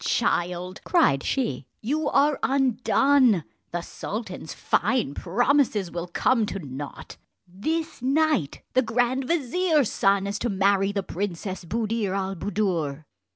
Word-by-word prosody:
"Child," 180 -4 0
cried 315 - +3
she, 260 - -2
"you 295 +7 -1
are 285 +1 +3
undone! 260 - +3 0.3
the 175 - -3
sultan's 190 -2 -6
fine 210 - 0
promises 215 - +1
will 170 0 -4
come 225 +5 +1
to - - -4
nought. 145 -4 -8 0.3
This 310 - -3
night 275 - +1
the 255 - +4
grand 245 +3 0
vizier's 320 - +1
son 195 0 +2
is 200 +1 -3
to 240 - -1
marry 195 0 +2
the 200 -1 -2
Princess 190 0 -4
Buddir 215 0 -1
al 195 0 -1
Buddoor." 170 -7 -2
210 Hz, 125 wpm, -25 LUFS, 185-260 Hz, 0.3 s, the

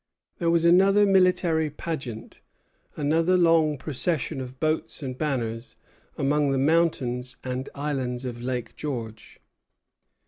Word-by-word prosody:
There 170 -2 +1
was 170 0 +2
another 195 +4 +5
military 180 -5 +3
pageant, 135 -7 -6 0.6
another 165 +5 +2
long 165 -3 +3
procession 150 0 -2
of 130 0 -9
boats 155 0 -2
and 130 -2 -4
banners, 120 -5 -3 0.4
among 145 +1 +1
the 135 - +1
mountains 130 -4 +1
and 130 +1 -4
islands 130 -3 -3
of 120 -1 -5
Lake 125 -2 -4
George. 115 -7 -6
145 Hz, 115 wpm, -25 LUFS, 125-165 Hz, 0.6 s, another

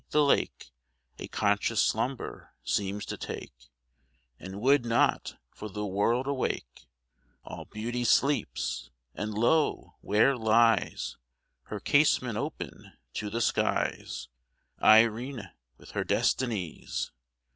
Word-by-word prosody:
the 150 - +4
lake 140 - +1 0.5
A - - -6
conscious 105 +2 +1
slumber 125 +4 -1
seems 100 0 -1
to - - -5
take, - - -8 0.7
And 95 +1 -7
would 135 +3 +4
not, 115 0 +1
for 105 - -8
the 105 +2 -4
world, 105 +6 +1
awake. 125 - -3 0.6
All - - -8
Beauty 120 +3 -4
sleeps! 70 - +1 0.2
and 105 +1 -4
lo! 145 +8 +1
where 110 +7 +3
lies 115 -1 +2 0.5
(Her 105 - -5
casement 130 -3 +3
open 150 +4 -6 0.2
to 105 - -3
the 115 +3 -2
skies) 65 - 0 0.5
Irene, 115 -1 +4 0.3
with - - -14
her - - -1
Destinies! 110 -10 -1
110 Hz, 110 wpm, -29 LUFS, 100-125 Hz, 0.7 s, the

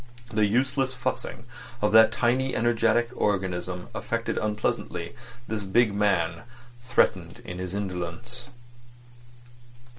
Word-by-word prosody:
The 105 -1 +3
useless 130 +4 +1
fussing 125 -1 -3 0.3
of 105 -2 +2
that 110 0 +8
tiny 130 +2 +1
energetic 120 0 +2
organism 90 -3 -1
affected - - -2
unpleasantly 105 0 -2 0.3
this 110 -2 -2
big 105 +2 +3
man 85 -5 +1 0.4
threatened 120 - +1
in 90 +1 -6
his 90 +1 -4
indolence. 100 +6 -5
105 Hz, 100 wpm, -27 LUFS, 95-120 Hz, 0.4 s, that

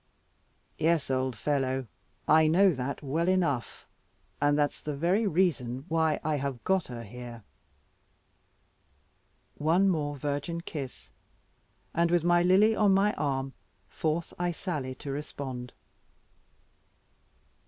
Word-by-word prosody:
"Yes, 160 -4 +2
old 130 -1 0
fellow, 135 -2 0 0.4
I 155 0 +6
know 185 +5 +5
that 135 0 -4
well 160 +5 0
enough; 170 - 0 0.6
and 145 0 +3
that's 145 -1 0
the 150 -1 -4
very 180 +9 +2
reason 145 -8 0
why 160 -1 +2
I 155 -1 0
have 135 -3 -4
got 190 -2 +1
her 120 -2 -7
here." 120 +1 -9 2.2
One 170 +6 +3
more 145 -4 -1
virgin 145 +4 -3
kiss, 140 -6 -7 0.8
and 170 +1 +2
with 175 -1 +2
Lily 185 +5 +4
on 205 -3 +4
my 205 +2 +3
arm, 135 -2 -2 0.4
forth 160 +1 -2
I 175 0 +1
sally 150 -7 -4
to 140 +2 -6
respond. 135 -3 -5
150 Hz, 115 wpm, -29 LUFS, 135-175 Hz, 2.2 s, I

